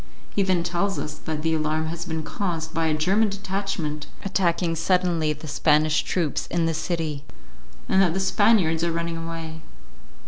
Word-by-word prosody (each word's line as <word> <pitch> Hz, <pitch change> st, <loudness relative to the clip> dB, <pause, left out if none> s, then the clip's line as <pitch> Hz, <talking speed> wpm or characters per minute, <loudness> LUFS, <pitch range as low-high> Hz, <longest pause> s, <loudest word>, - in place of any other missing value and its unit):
He 205 Hz, -, +2 dB
then 185 Hz, -3 st, +2 dB
tells 180 Hz, +3 st, 0 dB
us 150 Hz, -, -3 dB
that 155 Hz, 0 st, -5 dB
the 160 Hz, 0 st, +2 dB
alarm 155 Hz, 0 st, 0 dB
has 170 Hz, +2 st, -4 dB
been 160 Hz, -2 st, -3 dB
caused 165 Hz, -3 st, -3 dB
by 165 Hz, 0 st, +1 dB
a 155 Hz, -, +2 dB
German 195 Hz, +8 st, +3 dB
detachment 195 Hz, -6 st, -3 dB, 0.2 s
attacking 175 Hz, -3 st, +1 dB
suddenly 170 Hz, -2 st, +2 dB
the 150 Hz, +1 st, -6 dB
Spanish 155 Hz, +1 st, +3 dB
troops 165 Hz, -6 st, -1 dB
in 170 Hz, -1 st, 0 dB
the 165 Hz, -, +1 dB
city, 160 Hz, -3 st, -2 dB, 0.6 s
and 190 Hz, -, +4 dB
that 175 Hz, -3 st, +3 dB
the -, -, +1 dB
Spaniards 190 Hz, -5 st, +3 dB
are 170 Hz, -, +1 dB
running 170 Hz, 0 st, -2 dB
away. 165 Hz, -1 st, -6 dB
165 Hz, 170 wpm, -24 LUFS, 160-185 Hz, 0.6 s, and